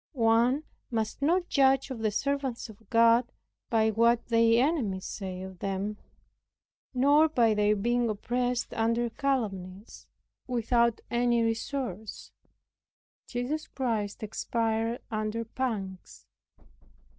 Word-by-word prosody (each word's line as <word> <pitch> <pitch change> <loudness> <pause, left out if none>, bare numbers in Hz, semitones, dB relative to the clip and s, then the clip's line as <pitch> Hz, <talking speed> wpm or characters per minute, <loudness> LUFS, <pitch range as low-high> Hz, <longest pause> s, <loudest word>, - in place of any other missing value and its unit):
One 240 +3 +3 0.3
must 225 0 -2
not 350 +5 +2
judge 270 -1 +3
of 250 - -5
the 220 -1 +1
servants 270 +1 -2
of 220 -1 -16
God 230 +1 +4 0.4
by 220 -1 +3
what 235 +2 +2
their 230 +1 +4
enemies 215 - -2
say 185 -2 -5
of 190 -1 -9
them, 195 +2 -3 0.9
nor 285 +5 +4
by 235 -7 +3
their 210 0 +2
being 240 +3 +1
oppressed 245 +3 -1
under 230 +1 0
calumnies 205 -8 -3 0.4
without 235 -1 +1
any 240 -1 +2
resource. 225 -3 -4 1.0
Jesus 270 +6 -3
Christ 220 -6 -2
expired 225 +2 -1
under 215 +1 -2
pangs. 215 -6 -5
230 Hz, 110 wpm, -28 LUFS, 215-250 Hz, 1.0 s, God